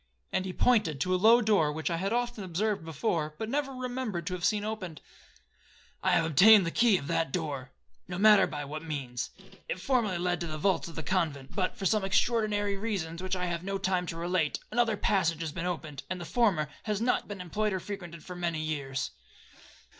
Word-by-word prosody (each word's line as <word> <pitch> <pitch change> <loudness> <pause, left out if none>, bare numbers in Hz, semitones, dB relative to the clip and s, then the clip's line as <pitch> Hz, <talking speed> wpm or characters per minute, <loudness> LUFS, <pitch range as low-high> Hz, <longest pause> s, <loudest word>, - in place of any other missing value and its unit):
and 185 - 0
he 190 - -3
pointed 195 - +2
to 185 +7 +1
a - - +4
low 225 +6 +6
door 205 -9 +3
which 160 +3 -2
I 165 - 0
had 195 +4 -1
often 240 -2 -1
observed 195 +2 -1
before, 160 -1 -2
but 220 - -4
never 280 0 0
remembered 250 -8 -3
to 180 - -3
have 180 -1 -5
seen 210 +1 +2
opened; 195 -7 -5 1.0
'I - - +1
have 165 - +3
obtained 190 +6 +7
the 165 - -1
key 225 -1 +4
of 140 - -6
that 150 0 0
door,—no 150 +2 -6
matter 210 0 +6
by 145 -1 -5
what 150 +2 -6
means. 140 -6 -4 0.4
It 185 - -2
formerly 225 -5 +1
led 175 0 -1
to 170 - -2
the 155 -1 -4
vaults 175 +2 +1
of 165 - -10
the 160 - -4
convent, 155 -8 -1
but, 190 +3 -1
for 195 - -4
some 210 +2 +2
extraordinary 205 0 +1
reasons, 185 -6 -3
which 185 0 -2
I 180 0 -1
have 170 -1 -3
not 195 0 -3
time 185 -2 +1
to 165 - -5
relate, 170 -2 0
another 230 -2 +2
passage 170 -6 +1
has 160 -2 -3
been 170 +3 -3
opened, 155 -6 -4
and 185 0 -3
the 175 - -6
former 190 -9 +2 0.2
has 210 -2 -1
not 245 +2 +1
been 205 -2 -6
employed 210 +4 -1
or 190 - -1
frequented 175 -4 -7
for 180 - -8
many 170 -2 -2
years. 140 -4 -3
180 Hz, 210 wpm, -29 LUFS, 160-210 Hz, 1.0 s, obtained